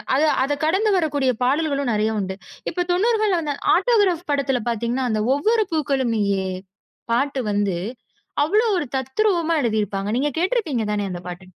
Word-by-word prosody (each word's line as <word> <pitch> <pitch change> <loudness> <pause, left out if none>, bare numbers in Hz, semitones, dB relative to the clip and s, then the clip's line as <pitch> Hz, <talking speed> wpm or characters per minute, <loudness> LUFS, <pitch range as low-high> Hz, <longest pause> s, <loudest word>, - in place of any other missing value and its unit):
அத 280 - +2 0.2
அதக் 285 +1 -2
கடந்து 390 +7 +2
வரக்கூடிய 285 -6 +1
பாடல்களும் 280 0 +1
நெறைய 215 +1 +1
உண்டு. 190 -1 -3 0.4
இப்ப 355 +1 -1
90கள்ல 425 -1 +2
வந்த 295 -2 -2 0.2
'ஆட்டோகிராப்' 390 -8 +2
படத்துல 275 -3 0
பாத்தீங்கன்னா, 235 +3 -1
அந்த 215 -1 0
"ஒவ்வொரு 435 +8 +2
பூக்களும் 275 -6 0
நீயே" 200 -2 0 0.7
பாட்டு 270 +2 0
வந்து 205 -3 0 0.7
அவ்வளோ 425 +9 +2
ஒரு 295 - -1
தத்ரூவமா 335 - +1
எழுதி 220 -2 +1
இருப்பாங்க. 195 0 -4
நீங்கக் 290 +2 -1
கேட்டுருப்பீங்க 335 - 0
தானே 205 -1 -1
அந்தப் 175 0 -7
பாட்டு. 180 +1 -8
280 Hz, 150 wpm, -22 LUFS, 220-350 Hz, 0.7 s, அத